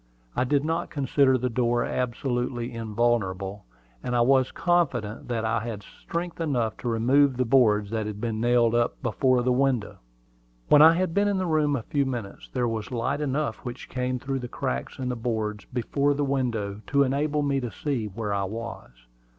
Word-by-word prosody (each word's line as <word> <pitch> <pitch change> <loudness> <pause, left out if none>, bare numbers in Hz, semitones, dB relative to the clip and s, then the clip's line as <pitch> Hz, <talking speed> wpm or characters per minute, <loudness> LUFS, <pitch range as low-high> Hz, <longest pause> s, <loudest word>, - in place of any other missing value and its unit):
I 125 - +1
did 145 +2 +1
not 165 +1 -1
consider 135 -2 +2
the 125 +1 -1
door 120 0 +1
absolutely 125 0 -2
invulnerable; 105 -4 -1 0.4
and 125 - -2
I 120 - +3
was 130 +1 +3
confident 170 - 0
that 115 -2 -2
I 115 +1 +1
had 110 -2 -6
strength 170 - -6
enough 125 -9 0
to 120 - -3
remove 130 +4 +3
the 125 - +1
boards 110 -5 +3
that 110 -2 -1
had 105 -1 -5
been 110 -1 -2
nailed 120 -1 +3
up 120 0 +1
before 125 +1 +2
the 125 - +2
window. 130 -4 0 0.7
When 150 - +7
I 160 +1 +9
had 180 -1 0
been 205 +2 +2
in 200 -1 +1
the 185 - 0
room 155 -3 +2
a 120 - -3
few 140 0 0
minutes, 120 -7 -6
there 125 -2 0
was 110 -2 -3
light 130 +4 -1
enough 140 -4 -1
which 125 0 -8
came 125 0 -2
through 135 +1 -3
the 125 - -5
cracks 65 - -4
in 130 - -3
the 125 - -1
boards 110 -3 -3
before 140 +3 0
the 145 0 0
window 115 -7 -1
to 140 -1 +3
enable 145 +2 0
me 140 -1 +1
to 125 -2 -3
see 120 +1 -2
where 105 0 -4
I 100 -1 0
was. 110 - -6
125 Hz, 190 wpm, -26 LUFS, 115-140 Hz, 0.7 s, I